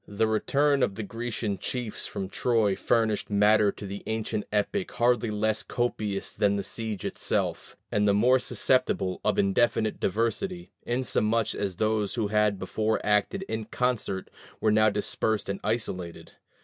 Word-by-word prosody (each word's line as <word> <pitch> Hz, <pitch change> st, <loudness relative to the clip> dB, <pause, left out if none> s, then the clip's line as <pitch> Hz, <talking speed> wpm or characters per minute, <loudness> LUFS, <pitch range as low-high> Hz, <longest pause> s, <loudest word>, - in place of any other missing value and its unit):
The 105 Hz, +2 st, 0 dB
return 140 Hz, +6 st, +2 dB
of 100 Hz, -, +1 dB
the 110 Hz, -, -4 dB
Grecian 115 Hz, -2 st, -3 dB
chiefs 125 Hz, -4 st, -4 dB
from 95 Hz, -, -4 dB
Troy 110 Hz, -1 st, +1 dB
furnished 110 Hz, -1 st, +1 dB
matter 105 Hz, 0 st, +4 dB
to 100 Hz, -, -9 dB
the 100 Hz, +1 st, -6 dB
ancient 110 Hz, -1 st, -2 dB
epic 105 Hz, -, -1 dB
hardly 120 Hz, -1 st, +2 dB
less 110 Hz, +1 st, 0 dB
copious 105 Hz, -5 st, -2 dB
than 100 Hz, -1 st, +1 dB
the 100 Hz, -, -2 dB
siege 110 Hz, -2 st, -5 dB
itself, -, -, -2 dB
and 105 Hz, 0 st, +2 dB
the 100 Hz, -, +4 dB
more 125 Hz, +5 st, +5 dB
susceptible 125 Hz, -6 st, +1 dB
of 105 Hz, -2 st, +1 dB
indefinite 110 Hz, +2 st, +2 dB
diversity, 115 Hz, -, -1 dB
inasmuch 115 Hz, -3 st, 0 dB
as 100 Hz, -3 st, -3 dB
those 110 Hz, 0 st, 0 dB
who 110 Hz, -4 st, -1 dB
had 105 Hz, -1 st, +2 dB
before 110 Hz, +4 st, -1 dB
acted 105 Hz, -, +1 dB
in 110 Hz, -, -4 dB
concert 120 Hz, -7 st, -2 dB, 0.3 s
were 110 Hz, -, +2 dB
now 110 Hz, 0 st, +5 dB
dispersed 105 Hz, +1 st, -1 dB
and 100 Hz, 0 st, -3 dB
isolated. 95 Hz, -6 st, -3 dB
110 Hz, 150 wpm, -27 LUFS, 100-115 Hz, 0.3 s, more